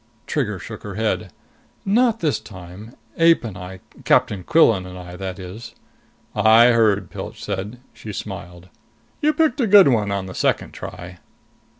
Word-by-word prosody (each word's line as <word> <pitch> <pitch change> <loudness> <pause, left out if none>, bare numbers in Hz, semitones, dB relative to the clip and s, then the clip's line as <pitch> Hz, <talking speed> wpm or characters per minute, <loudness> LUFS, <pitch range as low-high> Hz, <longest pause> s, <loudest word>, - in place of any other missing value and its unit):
Trigger 115 -10 -2
shook 100 +3 -9
her 100 -2 -8
head. 110 -2 -2 0.5
"Not 230 +3 +2
this 155 -4 0
time. 95 +4 -12 0.2
Ape 165 -2 +5
and 110 -5 -6
I 90 0 -9 0.2
Captain 95 -3 +2
Quillan 110 - +3
and 90 0 -9
I, 90 -1 -9
that 95 0 -6
is 95 +5 -9 0.3
" - - -37
"I 110 +3 +6
heard," 105 -5 +2
Pilch - - -8
said. 105 +4 -5
She 110 - -9
smiled. 90 -3 -8 0.5
"You 300 - +3
picked 305 -2 +1
a 235 - +2
good 200 -6 +7
one 110 -5 +1
on 100 -1 -2
the 95 - -8
second - - 0
try!" 90 0 -9
105 Hz, 165 wpm, -21 LUFS, 95-125 Hz, 0.5 s, good